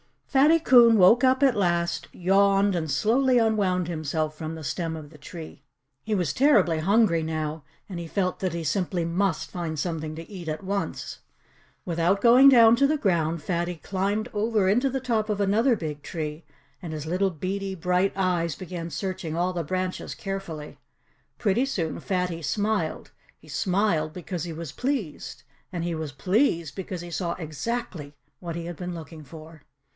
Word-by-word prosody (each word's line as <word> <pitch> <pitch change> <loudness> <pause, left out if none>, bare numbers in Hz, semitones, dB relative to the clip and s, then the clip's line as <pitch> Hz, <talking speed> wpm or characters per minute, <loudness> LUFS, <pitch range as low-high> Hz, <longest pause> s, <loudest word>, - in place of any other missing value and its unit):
Fatty 295 +5 +4
Coon 240 -7 +6
woke 225 +7 +6
up 260 +2 +3
at 265 -5 +4
last, 170 -3 0
yawned, 195 +2 +3
and 165 -3 -2
slowly 245 - +3
unwound 200 -6 +1
himself 155 -1 -2
from 160 0 -5
the 160 - -8
stem 165 +2 -3
of 155 -2 -9
the 155 - -15
tree. 155 0 -10 0.4
He 215 -1 -1
was 175 -7 0
terribly 205 - +4
hungry 195 -1 +3
now. 155 -1 -3 0.3
And 180 -3 -5
he 170 - -6
felt 185 +1 -1
that 185 -3 -2
he 170 -1 -3
simply 180 +1 -1
MUST 175 0 -1
find 170 -3 -4
something 155 -1 -3
to 165 +1 -8
eat 185 -5 -9
at 155 +2 -4
once. 200 +1 -3 0.7
Without 175 +3 +1
going 250 +3 +7
down 230 -3 +7
to 275 +2 +4
the 305 +2 +1
ground, 170 - 0
Fatty 175 0 -1
climbed 200 +6 -2
over 210 -2 +1
into 245 +7 +2
the 265 0 -3
top 225 -4 0
of 205 -1 -1
another 225 +6 +3
big 150 -6 -5
tree 155 +1 -5 0.4
and 170 -4 -6
his 155 -1 -5
little 185 +4 +1
beady, 190 +3 -4
bright 180 +2 +1
eyes 175 -5 0
began 175 -2 -6
searching 170 0 -4
all 180 +2 0
the 170 -3 -3
branches 185 +3 -3
carefully. 185 -7 -6 0.6
Pretty 220 +5 +1
soon 170 - -3
Fatty 180 -3 -2
smiled. 205 +7 -1 0.3
He - - -19
smiled 180 -6 0
because 180 -2 -5
he 170 - -5
was 160 -2 -6
pleased. 245 - -4 0.3
And 170 -2 -3
he 170 0 -2
was 155 -3 -5
pleased 170 - +1
because 185 -2 -6
he 175 0 -9
saw 170 0 -2
exactly 160 -2 -5 0.2
what 170 -2 -6
he 170 0 -5
had 175 -2 -6
been 180 -1 -5
looking 160 -1 -9
for. 155 +1 -13
180 Hz, 175 wpm, -26 LUFS, 160-205 Hz, 0.7 s, going